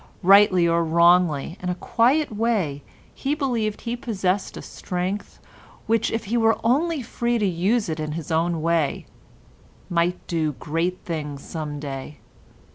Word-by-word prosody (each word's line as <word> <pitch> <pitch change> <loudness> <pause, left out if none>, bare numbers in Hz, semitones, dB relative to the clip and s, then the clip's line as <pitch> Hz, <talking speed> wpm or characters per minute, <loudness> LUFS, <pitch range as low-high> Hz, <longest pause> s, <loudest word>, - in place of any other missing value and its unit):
Rightly 190 -2 +6
or 170 0 +2
wrongly, 170 -1 +3
in 180 - -3
a 180 - -1
quiet 250 - +1
way 205 -11 0 0.3
he 280 +2 -2
believed 235 -8 -1
he 235 0 -3
possessed 200 -5 -2
a - - -6
strength 185 +3 -4 0.5
which, 225 0 +1
if 225 - -3
he 230 +5 0
were 225 -1 +3
only 290 +5 +1
free 235 +1 -1
to 210 - 0
use 195 +6 +1
it 160 -1 -3
in 155 -1 -3
his 165 0 -6
own 165 0 0
way, 165 -3 0 0.9
might 175 +1 0
do 160 -3 -1
great 165 +6 -2
things 150 -4 -5
some 150 -3 -5
day. 140 0 -6
180 Hz, 150 wpm, -23 LUFS, 160-225 Hz, 0.9 s, Rightly